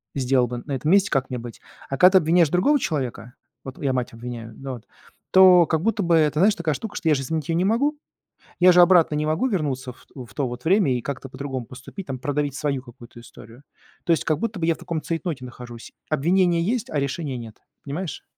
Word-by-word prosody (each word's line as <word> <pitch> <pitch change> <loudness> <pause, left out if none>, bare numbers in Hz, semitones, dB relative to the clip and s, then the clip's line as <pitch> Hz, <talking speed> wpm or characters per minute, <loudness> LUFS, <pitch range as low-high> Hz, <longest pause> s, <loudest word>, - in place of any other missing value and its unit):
сделал 130 -2 +2
бы 120 0 -5
на 145 - -8
этом 135 +4 -2
месте, 200 +1 +4
как 135 -2 0
мне 125 - -3
быть. 115 0 -9 0.3
А 135 - -3
когда 180 +7 +7
ты - - +8
обвиняешь 165 0 +3
другого 235 - +3
человека, 130 - -4 0.3
вот 135 -1 -8
я 135 -2 0
мать 125 -2 -2
обвиняю, 115 -1 -8
ну 135 0 -7
вот, 120 -2 -11 0.4
то 185 -3 +7
как 160 -2 0
будто 220 0 0
бы 170 -1 +3
это, 150 -2 +2
знаешь, 200 +3 +4
такая 160 -3 -1
штука, 215 -2 -7
что 165 - -1
я - - +5
же 135 - -2
изменить 155 +2 -3
её 165 - +1
не 180 - +1
могу. 260 +9 +1 0.6
Я 180 +1 +7
же 180 0 +6
обратно 175 -3 +5
не 150 0 -1
могу 160 +11 0
вернуться 140 - -2
ф 125 - -20
у 130 -3 -8
в 110 - -18
то 140 - -1
вот 125 +2 -8
время 180 -7 +3
и - - -5
как-то 135 +1 -6
по-другому 130 -1 -5
поступить, 135 - -10
там 130 -2 -5
продавить 145 +1 -2
свою 140 -3 -2
какую-то 120 -1 -14
историю. 115 +2 -15 0.4
То 170 - +4
есть 160 - -1
как 155 - +1
будто 220 -2 -3
бы 165 - -1
я 165 - +2
в - - -18
таком 170 -2 -4
цейтноте 165 -5 -4
нахожусь: 120 -1 -11 0.2
обвинение 170 +3 +2
есть, 225 +5 -2
а 150 - 0
решения 140 0 -3
нет. 115 -2 -11 0.2
Понимаешь? 150 +2 -5
150 Hz, 235 wpm, -23 LUFS, 130-175 Hz, 0.6 s, ты